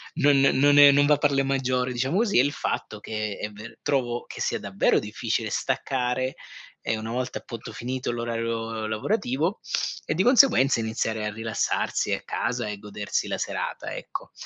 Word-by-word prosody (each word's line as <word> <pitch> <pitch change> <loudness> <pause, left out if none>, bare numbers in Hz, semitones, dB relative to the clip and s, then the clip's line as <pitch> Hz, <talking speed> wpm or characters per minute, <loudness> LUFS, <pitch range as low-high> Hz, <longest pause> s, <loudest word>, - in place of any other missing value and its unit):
non 145 -1 +4
non 140 +1 +4
è 145 -1 +10
non 145 +1 +4
va 150 0 +5
per 145 0 +2
le 135 0 +2
maggiori, 130 -2 0
diciamo 130 +8 0
così, 215 -2 +2
è - - +6
il 145 - +1
fatto 110 - -3
che 105 -1 -4
è 105 - -3
ver 105 +3 -11
trovo 120 -4 -1
che - - -8
sia - - 0
davvero 100 0 +2
difficile 110 +1 -2
staccare, 130 +1 -1 0.5
ehm, 110 - -1
una 110 +1 -5
volta 125 +1 -3
appunto 115 - -8
finito 125 +1 -3
l'orario 115 -1 -3
lavorativo 150 - -1 0.4
e, - - 0
di 185 - +2
conseguenza, 240 - +5
iniziare 110 -1 -2
a 105 - -2
rilassarsi 110 0 -1
a - - -2
casa 120 -2 -2
e 105 -1 -4
godersi 105 0 -3
la - - -1
serata, - - -4
ecco. - - -7
125 Hz, 175 wpm, -25 LUFS, 110-135 Hz, 0.5 s, è